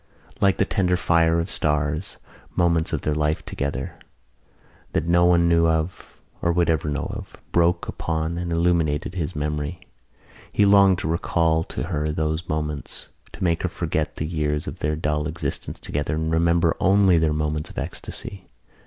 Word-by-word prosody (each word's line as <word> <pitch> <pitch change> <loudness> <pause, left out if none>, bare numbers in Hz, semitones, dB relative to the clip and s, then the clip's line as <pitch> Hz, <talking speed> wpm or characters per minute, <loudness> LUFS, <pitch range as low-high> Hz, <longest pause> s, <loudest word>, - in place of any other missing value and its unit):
Like 100 -1 +3
the 100 - +2
tender 90 -3 +1
fire 85 -1 +3
of 85 +3 -3
stars 75 +3 0 0.4
moments 85 -2 +2
of - - -1
their 75 - 0
life 75 +1 0
together, 70 +1 -4 0.9
that - - 0
no 85 +1 +4
one 85 -1 +4
knew 85 -1 +4
of 80 +2 -2 0.2
or 85 - +2
would 85 -1 +2
ever 75 -1 0
know 75 0 -2
of, - - -8 0.2
broke 85 0 +2
upon 80 +1 -2
and 85 -1 -3
illumined 85 -3 +2
his 90 -2 -3
memory. 75 +2 -3 0.7
He 105 - +3
longed 100 -2 +6
to - - -3
recall 80 0 +1
to - - -4
her 75 -3 -2
those 80 +2 -2
moments, 75 -1 -4 0.2
to - - -6
make 85 -2 +1
her 90 - -1
forget 80 -3 -2
the 75 - -3
years 75 -2 -1
of - - -7
their 75 +1 0
dull 75 -1 -1
existence 80 +2 -4
together 75 +1 -2
and 80 +1 -1
remember 85 0 +3
only 95 -2 +4
their 80 -1 +2
moments 75 0 -2
of - - -13
ecstasy. 95 -2 -6
80 Hz, 170 wpm, -23 LUFS, 75-85 Hz, 0.9 s, longed